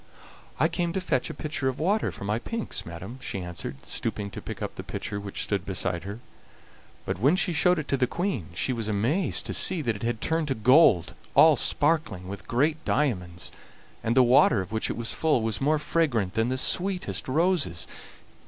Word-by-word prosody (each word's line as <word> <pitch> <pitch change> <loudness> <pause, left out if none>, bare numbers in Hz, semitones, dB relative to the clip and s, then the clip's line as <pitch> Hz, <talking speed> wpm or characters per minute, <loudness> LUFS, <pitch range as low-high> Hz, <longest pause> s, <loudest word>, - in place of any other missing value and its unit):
"I 155 - +5
came 170 0 -2
to 190 - 0
fetch 140 -9 -1
a - - -5
pitcher 150 -3 -2
of 130 - -4
water 200 +7 +1
for - - -9
my 105 +3 0
pinks, 230 - -4
madam," 95 +9 -8
she 100 - -4
answered, 75 -7 -6
stooping 100 +7 -3
to - - -7
pick - - -7
up - - -4
the - - -7
pitcher 100 - -5
which 100 -1 -4
stood 100 -3 -1
beside 90 -2 -2
her; 100 +4 -6 0.8
but - - -3
when 140 - +4
she 185 -1 +1
showed 180 +3 +3
it 155 - -3
to 140 - +2
the 130 -1 +2
Queen 170 - -2
she 130 - 0
was 115 -3 -3
amazed 115 - +1
to - - -3
see 185 -2 +1
that 115 -4 0
it 100 - -9
had 115 -1 -1
turned 160 +3 0
to 135 - 0
gold, 110 - +5 0.2
all - - +8
sparkling 145 - +1
with 100 +1 -8
great 150 +6 +1
diamonds, 90 -12 -1 0.5
and 115 +3 0
the 130 - +8
water, 120 -3 +5
of 95 +1 -5
which 110 0 -1
it - - -3
was 115 -1 -3
full, 150 -8 +2
was 110 +1 -1
more 150 +3 +3
fragrant 140 - 0
than 115 +2 +1
the 130 - -1
sweetest 180 - -1
roses. 140 - +1
125 Hz, 205 wpm, -27 LUFS, 100-160 Hz, 0.8 s, all